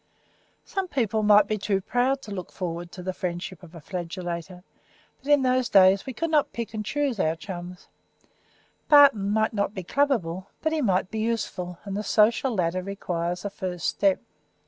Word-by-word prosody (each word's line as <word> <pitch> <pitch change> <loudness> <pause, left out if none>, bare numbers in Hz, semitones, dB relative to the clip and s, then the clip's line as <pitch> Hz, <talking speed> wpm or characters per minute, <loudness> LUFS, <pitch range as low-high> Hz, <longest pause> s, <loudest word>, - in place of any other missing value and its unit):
Some 390 -1 -3
people 225 - 0
might 210 -1 +6
be 215 +1 -2
too 195 0 0
proud 255 +7 0
to 210 - -9
look 185 -3 -6
forward 175 -1 -5
to 180 - -8
the 185 +1 -3
friendship 175 0 -5
of 175 -1 -14
a - - -8
flagellator, 175 +1 -6 0.6
but 280 +2 -2
in 290 -2 +5
those 255 -1 +2
days 195 +3 +5
we 260 - -4
could 330 +5 -2
not 300 -2 +2
pick 235 -1 -5
and 215 -1 -3
choose 280 -1 -1
our 160 -2 +1
chums; 180 0 -8 1.0
Barton 275 -9 +6
might 220 +2 +1
not 205 0 -1
be 190 - -4
clubable, 190 -7 0 0.2
but 315 0 +1
he 315 - 0
might 190 -6 +1
be 220 - -3
useful, 205 -6 -2
and 200 -1 -5
the 205 - -1
social 225 +4 +2
ladder 180 -1 0
requires 180 -2 -3
a 205 - -3
first 180 -4 -5
step. 195 -2 +2
200 Hz, 185 wpm, -26 LUFS, 180-235 Hz, 1.0 s, might